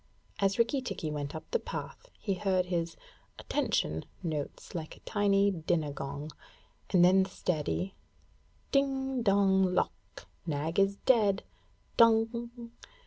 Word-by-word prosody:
As 195 0 +2
Rikki 235 +4 +2
tikki 160 -10 -4
went 145 -1 -4
up 160 - -5
the 475 - +2
path, - - -7
he 200 - -1
heard 185 -1 +1
his 170 -2 -2 0.4
'attention' 80 +1 -1 0.2
notes 155 -4 -4
like 160 -3 -6
a - - -20
tiny 200 -1 +2
dinner 160 -3 -1
gong; 140 +2 -5 0.6
and 180 -3 +6
then 190 +2 +6
the 190 - -1
steady 180 +2 -2 0.8
'Ding 270 -2 +1
dong 195 -3 +3
lock! - - -3 0.2
Nag 155 +3 -1
is 195 0 +3
dead 210 -6 +4 0.6
_dong! 230 +1 +4
190 Hz, 130 wpm, -31 LUFS, 160-220 Hz, 0.8 s, and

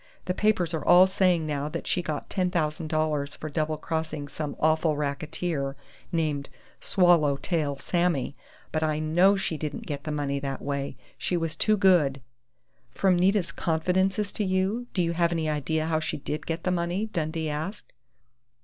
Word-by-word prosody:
"The 180 - 0
papers 185 -4 +2
are 155 -3 -2
all 180 +1 +7
saying 185 -3 +2
now 145 -1 -2
that - - -5
she 180 - +1
got 155 -4 -4
$10,000 155 -4 -1
for 155 - -5
double 155 +1 -1
crossing 160 -2 -3
some 150 0 -5
awful 155 0 +2
racketeer 145 0 -2 0.4
named 155 -4 -1 0.3
'Swallow 170 -6 +4
tail 145 -2 -1
Sammy', 170 -4 0 0.4
but 155 - -1
I 155 -1 +1
know 175 +6 +4
she 190 -5 -2
didn't 150 -1 -5
get 145 -2 -5
the 155 - -3
money 140 -2 -1
that 135 -1 -4
way! 140 -2 -3 0.2
She 180 - 0
was 165 -2 -2
too 215 +5 +3
good 175 -9 +4 0.4
" 125 0 -43
"From 190 -2 +4
Nita's 185 +1 +2
confidences 185 +5 0
to 210 - -2
you, 195 +5 0
do 180 - +3
you 170 - 0
have 170 0 +2
any 165 -2 -1
idea 155 +1 0
how 160 -1 +1
she 155 - -3
did 150 +1 -5
get 165 0 -3
the 185 - +1
money?" 175 +4 0
Dundee 160 -5 -2
asked. 160 +8 -5
160 Hz, 170 wpm, -27 LUFS, 150-180 Hz, 0.4 s, all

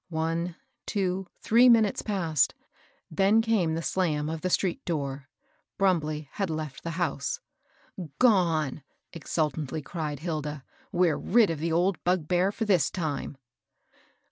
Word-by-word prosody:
One, 165 +1 -2 0.3
two, 190 -2 -1 0.2
three 240 +3 +6
minutes 225 -4 +4
passed; 170 -8 +1 0.6
then 195 +7 +4
came 215 -8 +1
the 165 - -3
slam 155 -5 0
of 160 0 -4
the 185 - -1
street 180 0 0
door. 140 -4 -3 0.5
Brumbley 155 -6 +1
had 195 -3 -2
left 155 -3 -4
the 165 0 -5
house.. 140 -3 -3 0.4
" 155 -6 -11
Gone," 165 - +3 0.3
exultingly 155 -3 -2
cried 150 -1 -4
Hilda. 150 -4 -4 0.3
We're 175 -3 +2
rid 220 -3 +3
of 160 - -4
the 165 +2 -1
old 175 +3 +1
bugbear 180 +1 +1
for 225 +2 -3
this 185 -9 +3
time." 150 -5 -4
165 Hz, 135 wpm, -27 LUFS, 155-190 Hz, 0.6 s, three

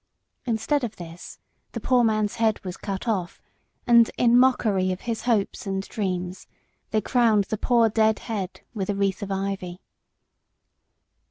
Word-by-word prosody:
Instead 245 +5 0
of 225 -3 -3
this, 170 0 -10 0.4
the - - -3
poor 250 -2 +3
man's 215 -1 +1
head 220 -2 +2
was 180 -1 -4
cut 195 +3 -5
off, 190 -6 -2 0.5
and, 235 -2 +6
in 240 -1 +4
mockery 220 -7 +3
of 185 - -4
his 230 -2 -3
hopes 215 -4 0
and 195 0 -3
dreams, 185 -3 -3 0.4
they 215 - +1
crowned 225 -3 +3
the 215 - -3
poor 235 -2 +3
dead 220 0 +2
head 200 -6 -5
with 195 -4 -3
the 205 - -1
wreath 195 -1 0
of 200 -1 -5
ivy. 190 -2 -3
210 Hz, 155 wpm, -25 LUFS, 190-230 Hz, 0.5 s, and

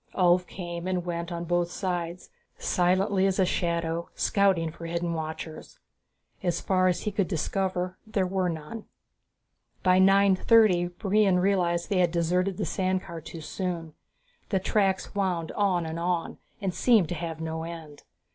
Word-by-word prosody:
Ulv 180 0 +3
came 175 -1 -6
and 180 -2 -1
went 170 0 -3
on 170 0 -3
both 175 0 +1
sides, 175 -2 -4 0.3
silently 190 +2 +2
as 190 - 0
a 190 - +4
shadow, 170 -1 -1
scouting 190 -5 +2
for 165 +1 -8
hidden 170 0 -2
watchers. 160 0 -6 0.6
As 175 -2 0
far 185 -1 +2
as 180 - +1
he 210 - -2
could 200 -2 0
discover 185 +1 -2
there 200 -3 0
were 185 -1 0
none. 165 +7 -6 1.0
By 185 0 +5
nine 195 0 +5
thirty 190 -4 +4
Brion 195 +1 +2
realized 180 -2 +1
they 190 - +2
had 175 -1 +4
deserted 180 +3 0
the - - -1
sand 185 0 -1
car 170 -1 -8
too 160 +1 -9
soon. 165 -1 -4 0.6
The 195 - +1
tracks 195 0 0
wound 185 -5 -1
on 190 -5 +1
and 160 +1 -4
on, 175 -1 -2 0.2
and 195 -4 -2
seemed 210 -3 +3
to - - -1
have 165 -1 -5
no 160 0 -3
end. 160 -3 -8
180 Hz, 160 wpm, -27 LUFS, 170-190 Hz, 1.0 s, By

